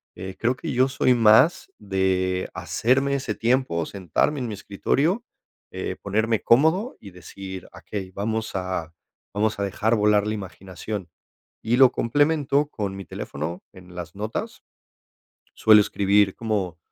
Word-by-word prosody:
Eh, 95 Hz, +1 st, -7 dB
creo 120 Hz, +3 st, +1 dB
que 155 Hz, +2 st, -5 dB
yo 130 Hz, +1 st, +3 dB
soy 130 Hz, -2 st, +2 dB
más 115 Hz, +8 st, +4 dB
de 95 Hz, -2 st, 0 dB
hacerme 135 Hz, +4 st, +1 dB
ese 125 Hz, -5 st, -2 dB
tiempo, 120 Hz, -9 st, 0 dB
sentarme 100 Hz, -, -1 dB
en 125 Hz, -, -3 dB
mi 110 Hz, -, -4 dB
escritorio, 140 Hz, -, 0 dB, 0.5 s
eh, 95 Hz, 0 st, -4 dB
ponerme 110 Hz, +2 st, 0 dB
cómodo 160 Hz, -, +3 dB
y 100 Hz, -, -11 dB
decir: 95 Hz, +1 st, -9 dB
"Okey, 95 Hz, -3 st, -7 dB
vamos 110 Hz, +2 st, -3 dB
a 90 Hz, -3 st, -3 dB, 0.4 s
vamos 110 Hz, +1 st, 0 dB
a -, -, 0 dB
dejar 105 Hz, +3 st, 0 dB
volar 105 Hz, -1 st, +3 dB
la 110 Hz, -, -1 dB
imaginación". 95 Hz, -1 st, -7 dB, 0.5 s
Y 115 Hz, +2 st, +1 dB
lo 130 Hz, -1 st, +7 dB
complemento 145 Hz, +2 st, +1 dB
con 100 Hz, -6 st, -4 dB
mi 95 Hz, -, -7 dB
teléfono 80 Hz, +3 st, -6 dB
en 90 Hz, -1 st, -14 dB
las 85 Hz, -1 st, -7 dB
notas, 105 Hz, +2 st, -5 dB, 0.9 s
suelo 110 Hz, -1 st, +6 dB
escribir 100 Hz, -1 st, +2 dB
como 100 Hz, -6 st, -2 dB
105 Hz, 140 wpm, -24 LUFS, 95-125 Hz, 0.9 s, lo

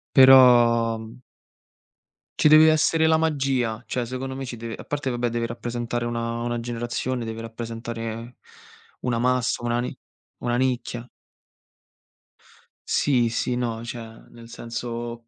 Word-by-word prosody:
Però, 120 Hz, -4 st, +7 dB
mhmm 115 Hz, +3 st, -11 dB, 1.2 s
ci -, -, +5 dB
deve 155 Hz, +1 st, +8 dB
essere 160 Hz, +1 st, +2 dB
la 160 Hz, 0 st, +4 dB
magia, 135 Hz, -7 st, 0 dB
cioè 125 Hz, -2 st, -3 dB
secondo 130 Hz, +2 st, -5 dB
me 135 Hz, -, -5 dB
ci 125 Hz, -2 st, -6 dB
deve 115 Hz, 0 st, -6 dB
a -, -, -10 dB
parte 145 Hz, -3 st, -3 dB
vabbè 120 Hz, 0 st, -1 dB
deve 115 Hz, 0 st, -2 dB
rappresentare 120 Hz, 0 st, -4 dB
una 115 Hz, 0 st, -3 dB
una 120 Hz, 0 st, -2 dB
generazione, 120 Hz, +1 st, -3 dB
deve 115 Hz, 0 st, -5 dB
rappresentare 115 Hz, 0 st, -6 dB, 0.6 s
una 120 Hz, -2 st, -1 dB
massa, 125 Hz, -1 st, 0 dB
una 120 Hz, 0 st, 0 dB
ni 125 Hz, -, -4 dB, 0.4 s
una 120 Hz, 0 st, -1 dB
nicchia. 125 Hz, -2 st, -2 dB, 1.8 s
Sì, 125 Hz, -5 st, +2 dB
sì 120 Hz, +2 st, -1 dB
no, 115 Hz, -2 st, -2 dB
cioè, 115 Hz, -2 st, -9 dB
nel 115 Hz, 0 st, -14 dB
senso, 115 Hz, 0 st, -6 dB
120 Hz, 135 wpm, -24 LUFS, 115-125 Hz, 1.8 s, deve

